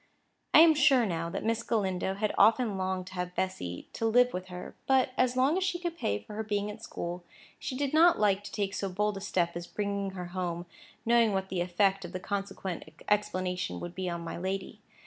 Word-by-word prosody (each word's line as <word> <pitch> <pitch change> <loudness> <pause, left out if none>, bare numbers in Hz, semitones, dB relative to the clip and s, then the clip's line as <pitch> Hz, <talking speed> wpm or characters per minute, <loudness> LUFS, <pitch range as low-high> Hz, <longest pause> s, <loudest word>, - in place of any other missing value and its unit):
I - - +11
am 325 -1 +8
sure, 270 -5 +5
now, 170 -3 -2
that - - -4
Miss 230 +1 +1
Galindo 190 -5 -1
had 210 +1 -1
often 225 -2 +4
longed 185 -1 -2
to 190 - -11
have 180 0 -4
Bessy 90 - -3
to 225 - -1
live 245 +2 +4
with 185 +1 -4
her; 180 -1 -8
but, 260 -1 +3
as 255 0 +2
long 280 +8 +3
as - - -1
she 365 -1 0
could 345 -1 -4
pay 100 - -1
for 105 - -11
her 215 - -3
being 205 -1 -1
at 215 +2 -11
school, 175 -5 -5 0.4
she 255 - -4
did 285 0 -1
not 335 +2 +6
like 205 -1 +2
to - - -7
take 200 -2 -2
so 195 - -2
bold 210 +3 0
a - - -6
step 175 -3 0
as 175 0 -5
bringing 200 -2 -2
her 180 -1 -5
home, 175 -2 -3 0.4
knowing 230 -2 +4
what 190 0 -1
the 180 -2 -1
effect 190 +2 +2
of 175 +1 -8
the 185 - -3
consequent 190 -4 -5
explanation 185 -3 0
would 175 0 -6
be 185 -1 -3
on 170 -1 -4
my 165 - -5
lady. 190 +1 -4
195 Hz, 225 wpm, -30 LUFS, 180-230 Hz, 0.4 s, I